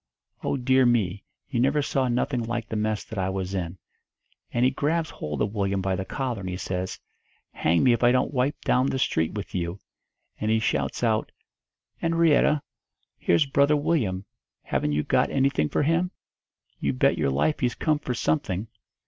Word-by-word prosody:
Oh, - - 0
dear 130 +1 +3
me, 105 -6 +2 0.3
you 120 - -2
never 140 +4 +2
saw 135 -2 0
nothing 125 +1 0
like 115 0 -3
the - - -3
mess 110 0 -1
that 110 - -6
I 95 0 0
was 95 0 -3
in! 90 -1 -3 0.7
And 120 +1 +2
he 130 - +4
grabs 155 +4 0
hold 75 -2 -3
of 105 - -2
Willyum 100 -2 0
by 95 0 0
the 95 +1 -3
collar, 125 0 -3
and 95 -1 -5
he 90 - -3
says, 95 0 -4 0.5
'Hang 85 +1 +2
me 125 -2 +5
if 120 - -1
I 120 0 +5
don't 130 +3 +1
wipe 130 +2 0
down 130 +1 +2
the 135 - -1
street 80 -10 0
with 105 -1 -6
you!' 85 0 -2 0.6
And 105 - -1
he 110 - +4
shouts 110 +2 -1
out, 110 -2 +1 0.7
''Enrietta, 165 -3 +3 0.6
here's 85 - +3
Brother 140 +2 +3
Willyum. 120 - 0 0.4
Haven't 75 - -1
you 75 +1 +1
got - - +2
anything 135 - +1
for - - +1
him? 165 +4 +2 0.7
You 70 - 0
bet 65 - +2
your - - +2
life 70 - +1
he's 125 -2 0
come 155 -2 +1
for 125 -4 -3
something.' 115 - -1
120 Hz, 185 wpm, -26 LUFS, 95-135 Hz, 0.7 s, me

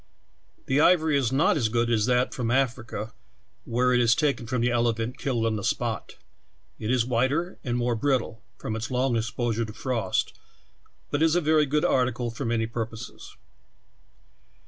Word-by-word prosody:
The 135 +2 +1
ivor^^ 160 -1 +4
is 130 -4 +1
not 145 +6 +3
as 115 -6 +1
good 120 +1 0
as 110 -1 +2
that 125 0 +2
from 120 -3 -2
Africa, 120 -4 -1 0.5
where 125 +2 +1
it 125 - +4
is 120 -1 +4
taken 140 -6 0
from 125 0 -1
the 120 - +2
elephant 120 0 0
killed 120 -5 -1
on 110 -1 0
the 100 - -5
spot; - - -2 0.6
it 110 - -4
is 125 -2 +2
whiter 130 +9 0
and 120 -2 -1
more 120 0 0
brittle, 120 -3 -1 0.2
from 110 - -4
its 110 +1 -4
long 130 -1 +1
exposure 115 0 -1
to 110 -1 -7
frost, 115 -7 -1 0.8
but 145 - 0
is 160 0 +4
a - - +4
very 155 -1 +3
good 150 +2 +1
article 125 -2 +1
for 125 +4 -5
many 115 -1 0
purposes. 115 +1 -7
120 Hz, 170 wpm, -26 LUFS, 115-135 Hz, 0.8 s, ivor^^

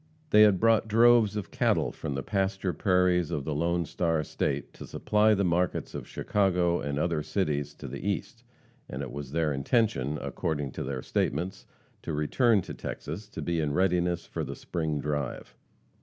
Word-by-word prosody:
They 105 - +7
had 105 -4 +6
brought 115 -1 +3
droves 115 -1 +5
of 105 -3 -4
cattle - - +1
from 70 - -5
the 70 - -3
pasture 95 -2 -1
prairies 90 -3 +2
of 75 -5 -3
the 75 - -2
"Lone 85 +3 0
Star" 80 -2 0
state - - -2
to - - -10
supply 105 0 +2
the 100 - +1
markets 90 0 0
of - - -6
Chicago 90 -4 +1
and 70 -1 -3
other 80 0 0
cities 75 -5 -2
to - - -8
the - - -6
east, - - -3 0.5
and 65 +2 -4
it 65 - -6
was 70 -2 -7
their 80 -1 +1
intention, 75 - +1
according 75 -4 -3
to - - -6
their 65 -1 -4
statements, 90 +7 -2 0.3
to 80 - -4
return 100 - +2
to - - -7
Texas 90 +8 -6
to - - -6
be 85 -1 -1
in 75 -2 0
readiness 90 -1 +1
for - - -4
"the - - -5
spring 80 -3 -3
drive." 75 -2 -3
85 Hz, 180 wpm, -28 LUFS, 75-100 Hz, 0.5 s, They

